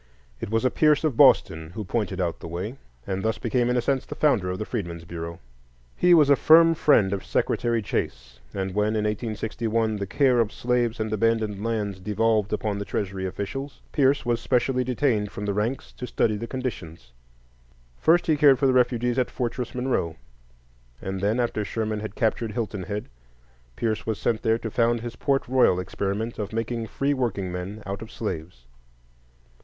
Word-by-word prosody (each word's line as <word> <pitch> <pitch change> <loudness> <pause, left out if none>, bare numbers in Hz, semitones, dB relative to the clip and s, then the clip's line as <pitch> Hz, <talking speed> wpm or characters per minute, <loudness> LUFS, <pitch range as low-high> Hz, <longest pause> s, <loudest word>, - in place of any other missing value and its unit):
It - - -5
was 115 +3 0
a 130 - +3
Pierce 150 -1 +3
of 155 -6 +1
Boston 80 -6 +4
who 110 - -3
pointed 105 0 -2
out 85 -3 -1
the - - -8
way, 90 +9 -4 0.3
and 95 0 -2
thus 110 +1 0
became 120 +1 0
in 125 - +2
a - - +2
sense 135 -1 +1
the - - -8
founder 120 -12 +2
of 90 - -2
the 110 - -4
Freedmen's 85 -8 -5
Bureau. 85 0 -6 0.6
He 180 -1 +5
was 150 -4 +6
a - - +8
firm 165 +3 +6
friend 115 -11 +3
of 100 - -3
Secretary 115 -2 0
Chase; 60 -9 -4
and 95 -1 -3
when, 105 +2 +1
in 105 - 0
1861, 110 +1 -1
the 100 -1 -4
care 130 +1 +3
of 115 -2 +2
slaves 120 -1 0
and 110 0 -2
abandoned 110 -2 0
lands 105 -4 -2
devolved 105 +2 +1
upon 105 -1 -1
the - - -2
Treasury 95 -2 -3
officials, 135 +9 -5
Pierce 140 -2 +2
was 120 -1 0
specially 125 +1 +1
detailed 125 -5 0
from 105 - -6
the 100 - 0
ranks 110 +6 -2
to 125 - -7
study 110 -3 +1
the 115 +3 -5
conditions. 90 - -6 0.9
First, 170 +2 +4
he 155 -2 +2
cared 140 -2 +6
for 140 - +1
the 130 - +4
refugees 125 0 +2
at 125 - +1
Fortress 125 0 -3
Monroe; 125 -11 -1 0.8
and 95 0 -4
then, 105 +4 +1
after 120 -3 0
Sherman 110 0 -2
had 105 -1 -6
captured 110 -1 0
Hilton 110 -4 -3
Head, 100 +4 -4 0.7
Pierce 110 - -1
was 110 -2 -1
sent 115 -1 0
there 115 -1 +2
to 115 -1 -6
found 120 0 +2
his 120 0 -6
Port 135 -1 0
Royal 125 -8 +4
experiment 100 +5 -3
of 105 0 -4
making 115 0 -2
free 140 +5 0
workingmen 100 -5 -3
out 100 +1 -5
of 115 - -9
slaves. 80 - -5
110 Hz, 185 wpm, -25 LUFS, 100-125 Hz, 0.9 s, a